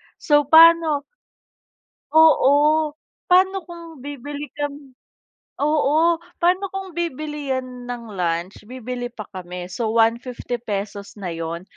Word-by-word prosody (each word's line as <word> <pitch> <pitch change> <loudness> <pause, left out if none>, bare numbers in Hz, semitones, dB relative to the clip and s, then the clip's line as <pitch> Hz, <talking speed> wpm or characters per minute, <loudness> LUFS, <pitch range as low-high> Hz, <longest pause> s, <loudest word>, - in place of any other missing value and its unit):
so 295 -2 +2
paano 325 -1 +6 1.1
Oo. 305 0 +5 0.4
Paano 375 +1 +4
kung 335 -5 -11
bibili 290 +1 -7
kami 285 -1 -5 0.7
oo. 310 +3 +3 0.2
Paano 365 +3 +2
kung 385 -1 -5
bibili 300 -3 -3
yan 255 -1 -6
ng 235 -3 -7
lunch, 175 +2 -2
bibili 250 0 -5
pa 215 -4 -8
kami, 180 -1 -7
so 220 +3 -2
₱150 235 +2 0 0.6
na 185 - -4
yun, 165 +1 -5
285 Hz, 105 wpm, -22 LUFS, 235-320 Hz, 1.1 s, paano